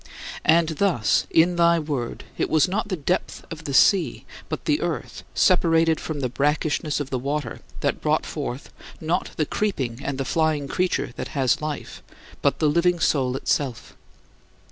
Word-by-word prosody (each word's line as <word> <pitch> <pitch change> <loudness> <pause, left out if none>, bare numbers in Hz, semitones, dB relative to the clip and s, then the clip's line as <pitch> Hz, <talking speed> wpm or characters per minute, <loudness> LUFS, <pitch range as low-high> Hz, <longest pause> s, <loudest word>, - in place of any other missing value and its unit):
And 165 0 +5
thus, 160 - +1
in 170 +2 +3
thy 170 0 +5
Word, 145 -7 -3
it - - -1
was 160 +3 +4
not 205 +3 -2
the 195 - -1
depth 170 +5 -2
of 165 -1 -8
the 140 - -3
sea 195 +3 +4 0.2
but - - -4
"the - - +1
earth," - - -3
separated 165 -3 +3
from 150 -3 -4
the 130 - +1
brackishness 150 +3 0
of 145 -2 -5
the 130 - -1
water, 140 -2 -3 0.2
that - - -1
brought - - +1
forth, 125 +3 -5 0.3
not 165 +3 -1
"the 155 - +1
creeping 140 - -2
and 140 -1 -3
the 135 - -2
flying 155 -1 +1
creature 180 +6 -1
that - - -4
has 130 0 +2
life," 150 -1 -5 0.4
but - - +2
"the - - 0
living 170 +3 +2
soul" 130 -5 +1
itself! 135 -3 -2
155 Hz, 165 wpm, -24 LUFS, 140-170 Hz, 0.4 s, And